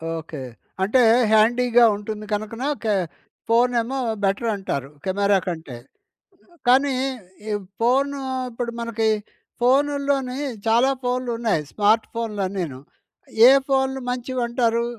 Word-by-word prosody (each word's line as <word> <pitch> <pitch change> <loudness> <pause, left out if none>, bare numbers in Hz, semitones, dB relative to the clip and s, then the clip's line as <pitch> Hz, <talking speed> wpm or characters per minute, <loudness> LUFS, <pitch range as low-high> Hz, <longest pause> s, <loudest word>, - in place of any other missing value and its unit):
Okay. 160 -3 -7 0.4
అంటే 215 +7 +3 0.3
హ్యాండీగా 240 +2 +4
ఉంటుంది. 210 +1 -6
కనుకన 215 +4 -4 0.2
క - - -8 0.6
ఫోన్ 240 +2 +4
ఏమో 265 +4 -4 0.3
బెటర్ 205 +4 0
అంటారు, 140 -9 -4 0.2
కెమెరా 200 +1 +2
కంటే. 160 -8 -5 0.9
కానీ 270 +2 +4 0.6
ఈ - - 0 0.3
ఫోన్ 270 +4 +2 0.4
ఇప్పుడు 235 0 -4
మనకి 230 -1 -1 0.5
ఫోన్‌‌ల్లోనూ 275 0 +1 0.3
చాలా 240 +4 +4
ఫోన్‌లు 250 0 -1
ఉన్నాయి. 220 -10 0
స్మార్ట్ 215 +2 +2
ఫోన్‌లు 225 -3 -3
అన్నీను. 175 -9 -4 0.7
ఏ - - +9 0.2
ఫోన్‌లు 265 0 +1
మంచివంటారు? 240 -2 -1
230 Hz, 110 wpm, -22 LUFS, 205-255 Hz, 0.9 s, ఏ